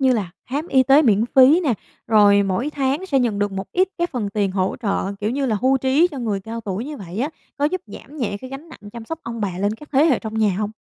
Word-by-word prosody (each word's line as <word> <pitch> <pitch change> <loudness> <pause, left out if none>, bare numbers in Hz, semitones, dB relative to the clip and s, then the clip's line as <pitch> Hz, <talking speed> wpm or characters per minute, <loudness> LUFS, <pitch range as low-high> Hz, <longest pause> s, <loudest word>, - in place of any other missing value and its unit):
như 260 -1 +4
là 200 -7 -2 0.2
khám 290 +6 -3
y 260 -1 +4
tế 275 +4 +5
miễn 220 -5 +3
phí 270 +6 +7
nè, 255 -7 +2 0.3
rồi 205 -2 +5
mỗi 200 +10 -1
tháng 285 +6 -1
sẽ 275 -6 +2
nhận 230 -5 0
được 205 -1 0
một 195 0 -6
ít 370 +1 +2
cái 345 - +1
phần 235 -10 -3
tiền 200 -1 0
hỗ 185 0 -1
trợ 200 -1 -1
kiểu 210 +2 -1
như 275 +1 -1
là 220 -3 +1
hưu 265 +1 +3
trí 270 +7 +3
cho 280 - -7
người 215 -5 -2
cao 225 +3 -6
tuổi 205 +2 -4
như 295 0 -6
vậy 190 0 -8
á, 275 +5 0 0.3
có 285 - -1
giúp 360 +4 0
giảm 295 +3 -12
nhẹ 210 -7 -2
cái 260 - -9
gánh 280 +5 -9
nặng 205 -8 -12
chăm 235 -1 -8
sóc 325 +6 -5
ông 230 -1 -6
bà 185 -4 -3
lên 205 +2 0
các 295 +6 -14
thế 275 +3 +5
hệ 280 -8 +3
trong 220 0 -7
nhà 210 -4 +2
hông? 210 0 -2
235 Hz, 280 wpm, -21 LUFS, 205-280 Hz, 0.3 s, phí